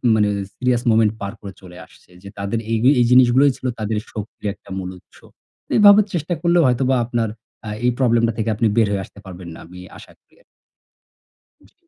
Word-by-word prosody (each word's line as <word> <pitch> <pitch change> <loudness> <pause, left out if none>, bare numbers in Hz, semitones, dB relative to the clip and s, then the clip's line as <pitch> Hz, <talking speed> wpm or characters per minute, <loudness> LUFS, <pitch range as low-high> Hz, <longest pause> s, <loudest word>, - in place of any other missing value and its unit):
মানে 105 -1 +2 0.3
serious 125 -1 0
moment 110 -1 +3
পার 100 +2 -5
করে 100 -1 -9
চলে 90 -1 -13
আসছে, - - -24
যে 100 - -9
তাদের 100 +3 -3
এই 115 - +1 0.2
এই 120 - +4
জিনিসগুলোই 130 +3 +5
ছিল 130 - -5
তাদের 110 0 -2 0.2
শক্তির 105 0 -8
একটা 100 - -21
মূল 95 -1 -5
উৎস। - - -22 0.6
এভাবে 205 0 +7
চেষ্টা 170 0 -2
করলেও 170 -1 +3
হয়তোবা 130 +1 +1
আপনার 115 -2 -2 0.4
আ - - -4 0.2
এই 125 - +3
প্রবলেমটা 115 -2 +2
থেকে 110 0 -1
আপনি 110 +2 +1
বের 110 -2 +4
হয়ে 100 -1 -2
আসতে 100 - -18
পারবেন 90 -2 -10 0.2
আমি 90 +2 -13 0.2
আশা - - -15
করি - - -33
আরকি। - - -29 1.3
জি। - - -32
115 Hz, 185 wpm, -20 LUFS, 100-125 Hz, 1.3 s, এভাবে